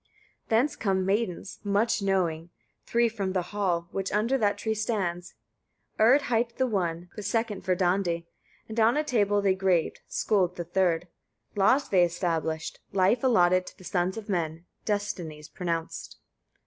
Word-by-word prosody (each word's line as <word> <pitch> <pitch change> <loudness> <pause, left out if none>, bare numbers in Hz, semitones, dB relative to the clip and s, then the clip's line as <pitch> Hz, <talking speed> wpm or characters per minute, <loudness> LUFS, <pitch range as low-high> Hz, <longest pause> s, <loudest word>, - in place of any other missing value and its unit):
20. - - -36
Thence 285 +5 0
come 190 -3 0
maidens, 195 -1 -1
much 205 +2 +1
knowing, 175 -4 0 0.4
three 235 0 +3
from 200 -4 -3
the 185 -2 0
hall, 180 -5 0
which 195 0 -3
under 220 +6 +1
that 210 -6 +1
tree 220 - -1
stands; 195 -5 -2 0.6
Urd 250 +7 +6
hight 235 -2 0
the 260 - +2
one, 180 -6 -2
the 210 - -5
second 210 0 -1
Verdandi, 180 -2 +1 0.5
on 225 +5 +4
a 305 - +2
tablet 205 -7 +1
they 195 -1 +4
graved 185 -3 +1
Skuld 185 -4 +1
the 175 - -4
third. 175 -1 +1 0.5
Laws 255 +8 +3
they 185 -3 +5
established, 165 -2 -2
life 200 +6 +2
allotted 185 -7 +4
to - - -11
the - - -15
sons 180 +2 -1
of 220 - -7
men; 170 -3 -2 0.2
destinies 175 -8 -3
pronounced. 165 0 -4
190 Hz, 150 wpm, -27 LUFS, 175-215 Hz, 0.6 s, Urd